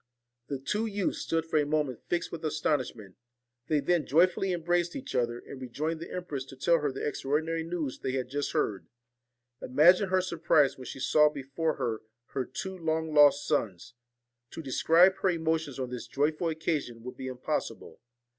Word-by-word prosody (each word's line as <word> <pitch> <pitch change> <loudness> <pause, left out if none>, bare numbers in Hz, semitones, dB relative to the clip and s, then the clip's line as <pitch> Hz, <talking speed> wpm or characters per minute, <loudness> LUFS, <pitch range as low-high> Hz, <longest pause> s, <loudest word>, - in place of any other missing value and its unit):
The 140 - -3
two 210 +12 -1
youths 205 -3 -1
stood 165 0 -1
for 165 -1 +1
a - - +3
moment 145 -5 -1
fixed 175 -1 -1
with 170 - -7
astonishment; 145 - -2 0.5
they 155 -2 +2
then 165 -1 +1
joyfully 180 +5 +3
embraced 175 0 0
each 275 - -6
other, 120 -2 0
and 130 +2 -10
rejoined 155 +6 -3
the 170 - -7
empress 155 -7 -4
to 135 - -12
tell 165 +5 +3
her 145 -2 -1
the 135 - -3
extraordinary 160 +3 -1
news 160 -5 -4
they 130 - -3
had 130 -2 -1
just 145 +2 -2
heard. 100 -3 -1 0.7
Imagine 175 +9 +5
her 185 0 +3
surprise 160 -5 +2
when 130 - -10
she - - -7
saw 150 +3 +4
before 150 +3 -2
her 110 -2 -2 0.3
her 130 -2 -2
two 190 +8 -6
long 160 -2 -2
lost 145 -1 +6
sons. 115 - -1 0.6
To 165 - -8
describe 170 +7 +4
her 190 - +1
emotions 160 -5 -1
on 130 -2 -4
this 125 -1 -6
joyful 155 +4 0
occasion 150 -7 -2
would 125 - -7
be 130 - -6
impossible. 130 -1 -4
150 Hz, 175 wpm, -29 LUFS, 130-165 Hz, 0.7 s, lost